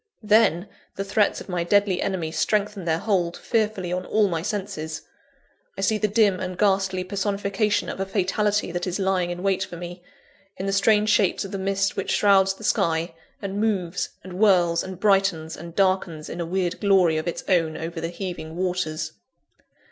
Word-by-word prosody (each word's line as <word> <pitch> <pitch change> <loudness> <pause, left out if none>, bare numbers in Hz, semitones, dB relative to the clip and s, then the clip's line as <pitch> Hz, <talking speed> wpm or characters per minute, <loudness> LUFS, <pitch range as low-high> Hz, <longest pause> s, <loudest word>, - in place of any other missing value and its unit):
Then, 210 -4 +3 0.3
the 195 - -2
threats 200 +1 +1
of - - -10
my 180 -3 -1
deadly 200 0 +2
enemy 175 -5 -2
strengthen 210 +1 0
their 160 -1 +1
hold 175 -3 0
fearfully 210 -6 -1
on 180 0 -2
all 210 +2 +2
my 165 -4 -2
senses. 170 -5 -4 0.7
I - - -3
see 220 -2 +1
the 210 - +2
dim 205 -3 +3
and 185 -1 -4
ghastly 195 -2 +1
personification 200 +2 -1
of - - -5
a 195 - 0
fatality 205 +1 0
that 175 +1 -3
is 180 - -2
lying 190 -3 0
in 175 +1 -5
wait 190 -1 +1
for 175 - -8
me, 175 +1 -8 0.6
in 190 - -4
the 195 - -1
strange 210 +1 +3
shapes 200 -2 +2
of 195 - -8
the 195 - -4
mist 195 +1 0
which 195 - -3
shrouds 195 -1 +4
the 220 - -13
sky, 165 -4 +1 0.3
and 200 +1 -3
moves, 190 -5 -1
and 185 0 -9
whirls, 180 -4 +3
and 190 -1 -8
brightens, 195 -6 +2
and 170 0 -10
darkens 185 -5 0
in 175 - -5
a 165 - -3
weird 180 0 -1
glory 190 -6 +4
of 155 - -3
its 170 - -3
own 165 -4 +2
over 165 +1 -5
the 165 - -2
heaving 175 -3 -6
waters. 175 -4 -2
190 Hz, 185 wpm, -24 LUFS, 175-200 Hz, 0.7 s, shrouds